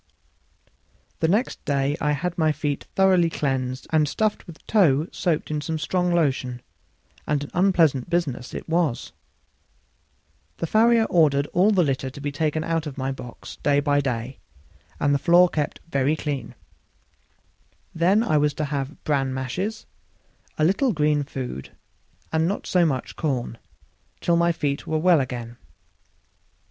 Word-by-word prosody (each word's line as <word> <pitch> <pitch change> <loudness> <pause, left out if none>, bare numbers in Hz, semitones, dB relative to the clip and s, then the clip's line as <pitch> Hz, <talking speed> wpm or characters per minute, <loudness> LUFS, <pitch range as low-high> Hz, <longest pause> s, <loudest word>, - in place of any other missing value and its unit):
The 160 - +2
next 210 +9 0
day 140 0 0
I 150 0 +2
had 170 +4 -2
my 160 -2 +2
feet 150 -1 -3
thoroughly 185 -3 +4
cleansed 130 -4 -2
and 155 -2 +3
stuffed 215 +4 -1
with 165 -2 -13
tow 160 -9 +3
soaked 165 -4 -1
in 150 -1 -1
some 160 +1 -3
strong 180 +3 0
lotion; 130 -7 0 0.6
and 145 -1 0
an 145 - -9
unpleasant 170 -8 +2
business 140 -8 -2
it - - -6
was. 165 -6 0 1.5
The - - -2
farrier 225 +5 +4
ordered 145 -7 +3
all 185 +4 +4
the 190 -4 +3
litter 135 -2 -1
to 135 - -11
be 145 0 -3
taken 155 +2 -1
out 165 -1 -1
of 145 - -8
my 135 0 -2
box 125 -3 -9
day 145 -1 +2
by 145 0 +2
day, 125 -1 -4 0.6
and 145 0 +2
the 140 - +2
floor 175 +4 +6
kept 150 -4 -3
very 140 -1 +1
clean. 145 -3 -4 1.4
Then 185 +7 +3
I 155 -9 +2
was 145 0 +1
to 155 - -2
have 140 +1 -4
bran 135 -3 0
mashes, 185 - -3 0.7
a 155 - +1
little 205 - +2
green 150 -2 +2
food, 130 - -6 0.6
and 160 +1 +2
not 200 - -3
so 175 -2 +3
much 130 -4 -3
corn, 125 -7 -2 0.6
till 170 - +2
my 170 0 +3
feet 145 -3 -2
were 160 - 0
well 165 -1 +4
again. 120 -2 -6
150 Hz, 155 wpm, -24 LUFS, 140-170 Hz, 1.5 s, floor